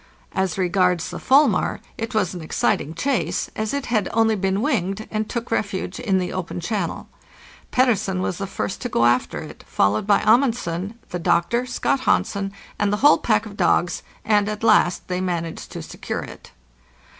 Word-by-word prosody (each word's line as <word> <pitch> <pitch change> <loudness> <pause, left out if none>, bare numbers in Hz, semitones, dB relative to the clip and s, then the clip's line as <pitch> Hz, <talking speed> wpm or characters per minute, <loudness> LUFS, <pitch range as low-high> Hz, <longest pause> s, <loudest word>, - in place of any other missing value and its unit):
As 190 -2 -1
regards 180 -2 +1
the - - -6
fulmar, 275 +3 +3 0.2
it 225 +1 -5
was 190 -4 +1
an 180 - -6
exciting 155 0 0
chase, 265 - -1
as 215 0 -2
it 280 -1 -2
had 215 -5 0
only 225 -1 +3
been 195 +1 0
winged, 215 - -1
and 215 0 -2
took 235 -1 -4
refuge 195 -2 -2
in 210 -6 +1
the 180 -1 -2
open 185 -1 -4
channel. 175 0 -3 0.6
Petter 250 -2 +4
sen 190 -2 -3
was 185 -1 -2
the 195 - -3
first 190 - -4
to 245 - -3
go 120 - +2
after 120 +1 +1
it, - - -10
followed 105 - +1
by 205 - +4
Amundsen, 215 -5 +2
the 180 - -4
doctor, 235 +9 +1
Scott 250 +2 0
Hansen, 200 -6 0 0.3
and 205 -1 +2
the 205 - +1
whole 295 - +7
pack 215 -6 +1
of 205 -2 -9
dogs, 175 -3 +2 0.2
and 210 -1 +3
at 215 +1 -5
last 180 -5 +3
they 180 0 -2
managed 170 -3 -3
to - - -6
secure - - -5
it. - - -11
200 Hz, 180 wpm, -22 LUFS, 180-225 Hz, 0.6 s, whole